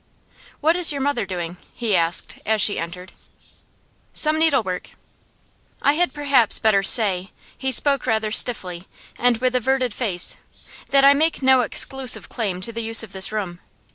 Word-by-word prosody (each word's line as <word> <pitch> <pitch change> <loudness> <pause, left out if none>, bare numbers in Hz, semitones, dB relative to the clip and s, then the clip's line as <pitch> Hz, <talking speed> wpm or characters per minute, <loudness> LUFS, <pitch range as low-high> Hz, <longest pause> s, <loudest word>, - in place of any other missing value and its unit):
'What 320 +3 +2
is 355 -3 +5
your 285 - -5
mother 280 -7 -2
doing?' 175 -2 -6 0.2
he 225 -5 -1
asked, 170 0 -1
as 220 0 -1
she 205 - +2
entered. 180 +2 -8 1.0
'Some 310 0 +1
needlework.' 260 - -1 0.9
'I 285 - +3
had 350 +3 0
perhaps 280 -6 +2
better 215 -3 +2
say' 195 -3 +4 0.3
he 265 0 -4
spoke 275 +1 +1
rather 220 -2 -1
stiffly, 185 -7 +1 0.3
and 245 -1 +2
with 255 +2 -1
averted 255 -1 -1
face 195 -7 0 0.5
'that 275 0 +3
I 280 - +7
make 310 0 -1
no 260 -1 +4
exclusive 265 +2 0
claim 195 -6 -4
to 230 - -1
the 230 - -5
use 225 0 +3
of 220 - -12
this 190 +1 -1
room. 190 -5 -5
230 Hz, 160 wpm, -20 LUFS, 195-270 Hz, 1.0 s, I